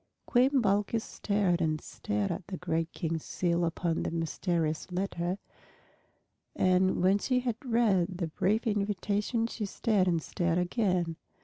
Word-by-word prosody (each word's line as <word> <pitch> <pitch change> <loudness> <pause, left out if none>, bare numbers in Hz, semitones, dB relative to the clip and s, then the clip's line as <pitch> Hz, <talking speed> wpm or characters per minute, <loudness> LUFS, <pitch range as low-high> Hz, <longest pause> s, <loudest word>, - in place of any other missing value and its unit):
Queen 260 +2 +3
Balkis 205 +2 +1
stared 200 -4 0
and 155 -1 +1
stared 105 -7 -3
at 170 - -5
the 185 -1 -5
great 165 -1 -1
King's 165 -3 -3
seal 175 -1 0
upon 165 0 -1
the - - -1
mysterious 165 0 -1
letter, 180 -1 -2 1.2
and 185 0 +3
when 195 +2 +4
she 250 +3 +1
had 240 -3 -2
read 205 -7 +2
the 175 - -1
brief 210 +9 +1
invitation 210 +2 0
she 230 -1 -4
stared 205 -1 +1
and 170 -2 +2
stared 170 -2 0
again. 180 -3 0
185 Hz, 140 wpm, -30 LUFS, 170-210 Hz, 1.2 s, when